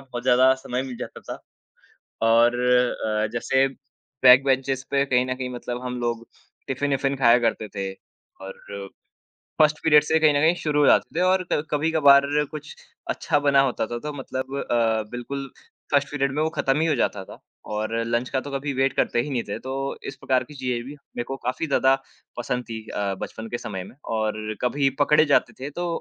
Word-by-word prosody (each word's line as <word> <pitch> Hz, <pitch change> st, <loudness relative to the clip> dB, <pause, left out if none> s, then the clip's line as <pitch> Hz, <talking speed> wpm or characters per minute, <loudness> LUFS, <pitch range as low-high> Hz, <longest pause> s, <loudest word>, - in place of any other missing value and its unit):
बहुत 125 Hz, -3 st, -7 dB
ज़्यादा 130 Hz, +1 st, +5 dB
समय 125 Hz, +1 st, -2 dB
मिल 130 Hz, -2 st, -7 dB
जाता 125 Hz, -, -8 dB
था। -, -, -5 dB, 0.9 s
और 115 Hz, +1 st, +5 dB
अ, 125 Hz, -3 st, +1 dB
जैसे 130 Hz, +3 st, +2 dB, 0.6 s
बैक 125 Hz, +1 st, +8 dB
बेंचेज़ 135 Hz, 0 st, 0 dB
पे 140 Hz, 0 st, +3 dB
कहीं 125 Hz, -2 st, +2 dB
न 130 Hz, 0 st, -2 dB
कहीं 130 Hz, -1 st, -4 dB
मतलब 120 Hz, 0 st, -5 dB
हम 125 Hz, -1 st, -4 dB
लोग 115 Hz, -1 st, -2 dB, 0.4 s
टिफिन-इफिन 135 Hz, 0 st, 0 dB
खाया 120 Hz, 0 st, +6 dB
करते 110 Hz, -1 st, -1 dB
थे, 95 Hz, -1 st, -3 dB, 0.5 s
और 95 Hz, 0 st, -7 dB, 1.1 s
1st 150 Hz, 0 st, +4 dB
पीरियड 150 Hz, -2 st, +6 dB
से 160 Hz, -, -1 dB
ही 160 Hz, -, +4 dB
कहीं 155 Hz, -2 st, +5 dB
न 145 Hz, -, +2 dB
कहीं 165 Hz, +3 st, +4 dB
शुरू 150 Hz, -1 st, +1 dB
हो 145 Hz, -, +5 dB
जाते 165 Hz, -, +3 dB
थे -, -, +2 dB
और 185 Hz, -1 st, +1 dB
क 150 Hz, -, +1 dB
कभी-कभार 145 Hz, -2 st, +5 dB, 0.2 s
कुछ 150 Hz, -1 st, -8 dB, 0.4 s
अच्छा -, -, 0 dB
बना 140 Hz, -1 st, +5 dB
होता 115 Hz, -, -2 dB
था, 120 Hz, +1 st, -4 dB
तो 150 Hz, +4 st, -5 dB
मतलब 135 Hz, 0 st, -5 dB
अ, 115 Hz, -2 st, +2 dB
बिल्कुल 135 Hz, +3 st, -6 dB, 0.4 s
1st 145 Hz, 0 st, +2 dB
पीरियड 140 Hz, -2 st, -1 dB
में 150 Hz, +3 st, 0 dB
वो 160 Hz, -, +1 dB
खत्म 135 Hz, 0 st, +1 dB
ही 165 Hz, -, +2 dB
हो 155 Hz, -, +2 dB
जाता 100 Hz, -4 st, 0 dB
था -, -, -12 dB, 0.4 s
और 110 Hz, +1 st, -2 dB
लंच 120 Hz, +2 st, -1 dB
का 135 Hz, -1 st, 0 dB
तो 145 Hz, -, -8 dB
कभी 140 Hz, +1 st, -3 dB
वेट 135 Hz, 0 st, +1 dB
करते 120 Hz, -, +1 dB
ही 145 Hz, +5 st, -3 dB
नहीं 125 Hz, -3 st, -1 dB
थे, 100 Hz, -, -3 dB
तो 135 Hz, +1 st, -4 dB
इस 135 Hz, -, -6 dB
प्रकार 130 Hz, -1 st, 0 dB
की -, -, -10 dB
चीज़ें 125 Hz, -3 st, -2 dB
भी 145 Hz, +3 st, -9 dB, 0.2 s
मेको 120 Hz, +3 st, -3 dB
काफ़ी 130 Hz, +6 st, -1 dB
ज़्यादा 135 Hz, -2 st, +3 dB, 0.4 s
पसंद 125 Hz, +1 st, -3 dB
थीं। 110 Hz, -1 st, -5 dB
अ, 100 Hz, -1 st, -2 dB
बचपन 110 Hz, 0 st, -6 dB
के 120 Hz, -, -1 dB
समय 95 Hz, -4 st, -6 dB
में -, -, -13 dB, 0.2 s
और 110 Hz, -1 st, 0 dB, 0.3 s
कभी 135 Hz, +2 st, +1 dB
पकड़े 150 Hz, +2 st, +5 dB
जाते 115 Hz, -, +3 dB
थे 135 Hz, +2 st, -5 dB
तो 175 Hz, -, -1 dB
130 Hz, 200 wpm, -24 LUFS, 120-140 Hz, 1.1 s, बैक